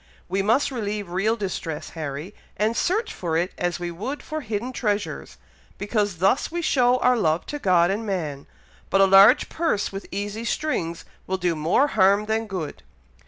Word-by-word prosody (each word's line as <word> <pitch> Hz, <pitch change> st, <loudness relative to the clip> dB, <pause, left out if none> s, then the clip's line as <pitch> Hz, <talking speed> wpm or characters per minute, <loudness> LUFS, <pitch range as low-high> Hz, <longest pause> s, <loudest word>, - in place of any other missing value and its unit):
We 190 Hz, +2 st, 0 dB
must 230 Hz, +8 st, +2 dB
relieve 210 Hz, -6 st, -4 dB
real 205 Hz, +5 st, +1 dB
distress, 185 Hz, -7 st, -4 dB
Harry, 155 Hz, +3 st, -6 dB, 0.2 s
and 215 Hz, +2 st, +1 dB
search 430 Hz, -, 0 dB
for 165 Hz, -3 st, -2 dB
it 175 Hz, +2 st, 0 dB
as 175 Hz, -1 st, -2 dB
we 175 Hz, -1 st, -4 dB
would 230 Hz, +12 st, -5 dB
for 310 Hz, 0 st, -4 dB
hidden 230 Hz, +1 st, -4 dB
treasures, 210 Hz, -4 st, -3 dB, 0.4 s
because 205 Hz, -2 st, -1 dB
thus 195 Hz, -, +2 dB
we 345 Hz, 0 st, -3 dB
show 250 Hz, -4 st, +3 dB
our 250 Hz, 0 st, +3 dB
love 165 Hz, -7 st, +1 dB
to 295 Hz, -, -5 dB
God 180 Hz, -5 st, +3 dB
and 210 Hz, +3 st, -2 dB
man; 160 Hz, -9 st, -4 dB, 0.4 s
but 195 Hz, -, +2 dB
a 195 Hz, -, +7 dB
large 195 Hz, +7 st, +7 dB
purse 320 Hz, -11 st, -1 dB
with 195 Hz, 0 st, -7 dB
easy 205 Hz, +3 st, -4 dB
strings 175 Hz, -, -2 dB, 0.2 s
will 190 Hz, -, -1 dB
do 175 Hz, -2 st, 0 dB
more 170 Hz, -, +2 dB
harm 200 Hz, -1 st, +3 dB
than 220 Hz, +1 st, -1 dB
good." 180 Hz, -7 st, -5 dB
200 Hz, 175 wpm, -24 LUFS, 175-230 Hz, 0.4 s, a